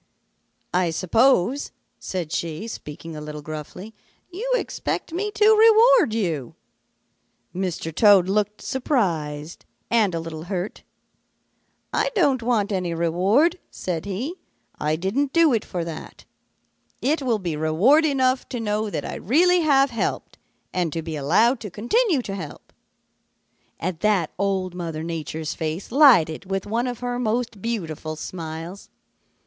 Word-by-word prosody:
"'I 180 -1 +2
suppose,' 225 - +2 0.3
said 175 -5 -4
she, 170 +3 -3
speaking 165 -5 -8
a 150 - -6
little 150 0 -7
gruffly, 155 +8 -8 0.4
'you 450 +8 -4
expect 410 - -3
me 405 +5 -1
to 420 - +3
reward 450 - +6
you.' 170 - -2 1.0
"Mr. 180 -3 -3
Toad 200 -1 +6
looked 210 +1 -1
surprised 165 - -2 0.3
and 215 -6 +3
a - - -1
little 165 -1 -7
hurt. 185 +1 -4 1.1
'I - - +1
don't 280 - +3
want 225 -4 +1
any 180 -3 -1
reward,' 195 - +2
said 170 -2 -4
he. 210 - -3 0.5
'I 155 +1 0
didn't 235 - -1
do 330 -4 +5
it 225 - +1
for 175 -2 -4
that. 165 -2 -9 0.7
It 295 +4 0
will 245 -4 +1
be 175 -6 -3
reward 170 - +4
enough 260 -3 +1
to 245 - -4
know 215 -1 -1
that - - -4
I - - -5
really 355 - +3
have 275 -4 +4
helped 230 - -3 0.3
and 175 -3 0
to 165 - -3
be 160 -1 -5
allowed 195 - +3
to 210 - -7
continue 275 - +1
to 195 - -5
help.' 170 -7 -8 1.1
"At 175 -2 -3
that 200 -6 +1
Old 190 -2 0
Mother 165 -3 -5
Nature's 160 -1 -4
face 160 +6 -4
lighted 195 - +5
with 195 -1 -2
one 230 +4 -1
of 245 -1 -5
her 245 0 -2
most 230 -2 -2
beautiful 165 -9 -4
smiles. 165 +3 -7
195 Hz, 140 wpm, -23 LUFS, 165-250 Hz, 1.1 s, reward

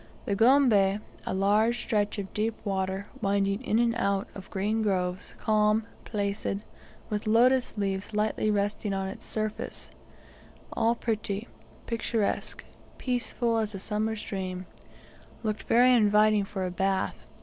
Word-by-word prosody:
The 200 - 0
Gombe, 220 -4 +5 0.3
a - - 0
long 210 +4 +3
stretch 210 -3 -1
of 195 -2 -5
deep 220 +1 0
water, 190 0 -1 0.2
winding 200 +1 +1
in 220 -4 +1
and 235 0 +3
out 200 -4 0
of 190 -1 -10
green 210 +3 0
groves, 185 -3 -1
calm, 215 0 +2 0.2
placid, 200 -1 -2 0.5
with 210 0 -2
lotus 245 +3 +4
leaves 195 0 -2
lightly 215 0 0
resting 205 0 0
on 195 0 -2
its - - -9
surface, 215 -1 -4 0.8
all 230 +1 +2
pretty, 215 -2 -2 0.4
picturesque, 230 -2 -2 0.3
peaceful 240 -2 0
as 215 -2 -2
a - - -5
summer's 215 +2 -2
dream, 185 -2 -4 0.8
looked 215 -1 -2
very 250 +2 +6
inviting 210 -2 +4
for 195 -1 -3
a 180 - -3
bath. 190 +1 -1
210 Hz, 135 wpm, -28 LUFS, 195-225 Hz, 0.8 s, very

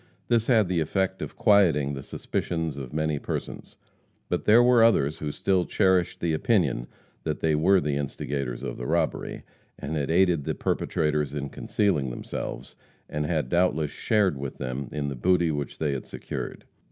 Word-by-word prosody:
This 115 -1 +2
had 110 -6 +4
the 90 -1 0
effect 95 +4 -1
of - - -6
quieting 85 - +4
the 70 - -5
suspicions 80 +2 -3
of 65 -3 -7
many 75 -1 -1
persons, - - -6 0.5
but - - -1
there 115 +3 +7
were 120 -2 +6
others 75 -10 +3
who 75 -1 -3
still 95 +3 +1
cherished 95 -2 +1
the 85 -2 +1
opinion 80 - +1 0.4
that 75 -1 -2
they 80 -1 +2
were 95 +6 +4
the 75 -3 -1
instigators 70 -3 -3
of - - -4
the - - -5
robbery, 80 0 -1 0.3
and 75 +3 -4
had 70 -2 -1
aided 85 -3 +3
the - - -2
perpetrators 75 -2 -1
in 70 -1 -3
concealing 85 -10 0
themselves, - - -6 0.3
and 75 0 -2
had 80 -6 0
doubtless 80 -1 +1
shared 100 -10 +1
with 70 -1 -5
them 65 +1 -4
the 70 -2 -3
booty 85 +4 +2
which 75 -2 -4
they 75 -2 0
had 70 -2 -4
secured. - - -6
80 Hz, 170 wpm, -26 LUFS, 70-95 Hz, 0.5 s, there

